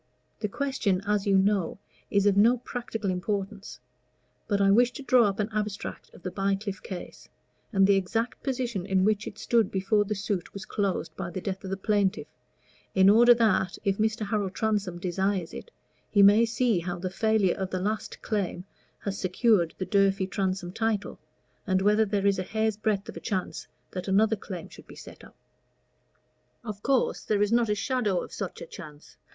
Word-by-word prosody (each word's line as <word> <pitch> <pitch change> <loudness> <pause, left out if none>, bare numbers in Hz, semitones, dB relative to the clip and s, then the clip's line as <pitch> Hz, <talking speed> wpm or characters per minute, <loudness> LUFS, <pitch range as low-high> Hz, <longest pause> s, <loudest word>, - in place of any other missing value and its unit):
The 210 - -1
question, 210 -6 -1
as 205 -1 0
you 195 -1 +4
know, 195 -2 +1 0.3
is 200 0 +2
of 205 -1 +4
no 230 +5 +5
practical 230 -4 -4
importance; 195 +2 -4 0.7
but 200 -2 +1
I 195 0 +4
wish 240 +4 +5
to 280 - -8
draw 250 -3 +5
up 200 0 -1
an 210 +1 0
abstract 210 -1 -4
of - - -16
the 185 - -4
Bycliffe 195 0 -2
case, 185 -3 -8 0.4
and 195 -3 +4
the 200 - +5
exact 225 +6 -2
position 250 -7 -2
in 190 -1 +2
which 215 0 +1
it 205 - -8
stood 230 -2 +2
before 195 +2 +1
the 210 +1 -3
suit 195 -2 -3
was 195 - -6
closed 200 -4 -2
by 190 -2 -4
the 175 - -5
death 195 +1 -4
of 190 - -6
the 195 - -2
plaintiff, 200 -1 +1 0.7
in 190 +1 +7
order 240 +3 +7
that, 200 -5 +1
if 195 0 0
Mr. 220 0 0
Harold 200 -2 -2
Transome 205 -5 -1
desires 185 0 -1
it, - - -8 0.4
he 200 -1 +5
may 205 +4 +7
see 230 -3 +1
how 175 +1 -4
the 180 +1 -4
failure 215 -2 +2
of 190 -1 -4
the 185 - -2
last 210 +3 -3
claim 190 -4 -2 0.4
has 200 0 -4
secured 185 -2 +2
the 185 - -3
Durfey 195 -1 +2
Transome 185 -1 -2
title, 220 -2 -2 0.5
and 185 -1 +2
whether 210 +3 +3
there 200 -1 -1
is 200 -1 +3
a - - -1
hair's 220 +2 -1
breadth 210 -1 -1
of - - -8
chance 190 -5 -3 0.2
that 185 +1 -5
another 215 +3 +3
claim 185 -4 -7
should - - -15
be - - -12
set - - -12
up. - - -15 1.3
Of 210 -3 -6
course 270 0 +1
there 205 -1 +1
is 205 - 0
not 235 -1 +3
a 210 - +2
shadow 210 -4 0
of - - -11
such - - -5
a - - -7
chance. 155 - -12
200 Hz, 190 wpm, -27 LUFS, 190-220 Hz, 1.3 s, in